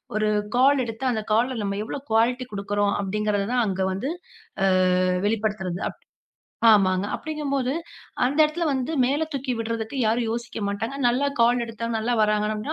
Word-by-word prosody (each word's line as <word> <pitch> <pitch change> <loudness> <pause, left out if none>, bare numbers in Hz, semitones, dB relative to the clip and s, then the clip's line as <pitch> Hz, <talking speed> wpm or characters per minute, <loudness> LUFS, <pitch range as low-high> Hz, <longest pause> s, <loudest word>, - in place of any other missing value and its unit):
ஒரு 215 0 +1 0.3
கால் 270 0 +4
எடுத்து 235 +3 -2
அந்தக் 220 -2 -4
கால் 245 +4 +2
நம்ம 200 0 -2
எவ்வளவு 275 +5 -7
குவாலிட்டி 245 +3 +2
கொடுக்கிறோம் 200 0 0
அப்படிங்கிறதை 205 0 -1
தான் 245 -2 +2
அங்க 190 -1 -2
வந்து 260 +11 -3 0.5
அ. - - +4 1.2
வெளிப்படுத்துறது. - - -15 0.7
ஆமாங்க. 190 -2 +4
அப்படிங்கும்போது 280 -4 -2 0.5
அந்த 280 +5 0
இடத்துல 320 +3 -1
வந்து 265 +3 -1
மேல 290 +5 +1
தூக்கி 270 -2 -2
விட்றதுக்கு 230 +2 -3
யாரும் 230 +2 +1
யோசிக்க 235 -1 -4
மாட்டாங்க. 225 +6 -3
நல்ல 255 +4 +2
கால் 240 +1 +4
எடுத்தா 230 0 -6
நல்லா 225 +3 -1
வராங்கன்னா, 215 +5 0
230 Hz, 145 wpm, -24 LUFS, 210-260 Hz, 1.2 s, கால்